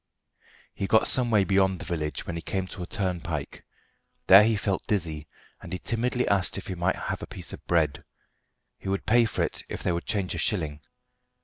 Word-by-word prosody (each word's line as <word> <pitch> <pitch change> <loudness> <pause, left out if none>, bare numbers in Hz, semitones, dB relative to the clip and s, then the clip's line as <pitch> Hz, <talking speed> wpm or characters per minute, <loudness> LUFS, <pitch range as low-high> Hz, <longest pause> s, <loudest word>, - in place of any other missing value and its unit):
He 95 - -3
got 110 - +4
some 125 -2 +3
way 105 -3 +4
beyond 95 -1 +2
the - - -8
village 75 -3 -3
when 85 - -4
he 85 - -4
came 95 +3 -2
to - - -8
a 90 - -5
turnpike. 90 -6 -3 0.6
There 95 +2 +9
he 110 +1 +2
felt 100 -2 -2
dizzy, 80 -7 -1 0.3
and - - -10
he 90 - -2
timidly 125 +5 -1
asked 100 -2 +2
if 95 - -6
he 95 - -4
might 90 +1 0
have - - -4
a - - -6
piece - - -2
of - - -9
bread. 75 -4 +1 0.8
He 95 - -6
would 100 0 -2
pay 120 +1 +5
for 110 - -1
it - - -2
if - - -6
they - - +1
would 85 0 -3
change 100 -4 -1
a 85 - -4
shilling. 80 -6 0
95 Hz, 210 wpm, -27 LUFS, 85-105 Hz, 0.8 s, There